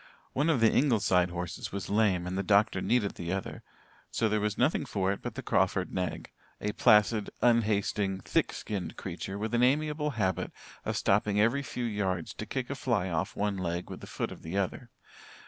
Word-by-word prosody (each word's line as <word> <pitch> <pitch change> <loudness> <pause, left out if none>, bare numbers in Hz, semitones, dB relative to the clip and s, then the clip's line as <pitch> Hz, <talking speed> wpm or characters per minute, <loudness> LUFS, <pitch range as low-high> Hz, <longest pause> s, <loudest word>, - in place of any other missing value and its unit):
One 145 +5 +1
of 140 -8 +2
the 115 - +6
Ingleside 100 -9 +3
horses 85 -2 -5
was 100 0 -4
lame 100 -4 +2
and 90 +1 -3
the 95 - 0
doctor 105 +3 +3
needed 115 -5 +1
the 85 0 -5
other, 95 0 -4 0.5
so 115 - +1
there 110 0 +1
was 105 0 -1
nothing 140 +5 +2
for 100 -7 0
it 100 - -4
but - - -5
the - - -5
Crawford - - +1
nag, 90 -1 -3 0.3
a 105 - -1
placid, 105 0 +4
unhasting, 105 -4 +2
thick - - +1
skinned 100 -5 -5
creature 95 +1 -5
with 110 +2 -3
an 120 - +3
amiable 150 +3 +2
habit 95 -4 0 0.3
of - - -1
stopping 105 +1 +2
every 115 +6 +3
few 125 -3 -4
yards 95 -6 -2
to - - -7
kick - - -3
a - - -2
fly 90 +1 0
off 85 +5 -2
one 100 -1 -1
leg 85 -1 -3
with - - -7
the - - -9
foot - - -3
of - - -10
the 80 +4 -4
other. 100 +5 -2
105 Hz, 200 wpm, -30 LUFS, 95-115 Hz, 0.5 s, the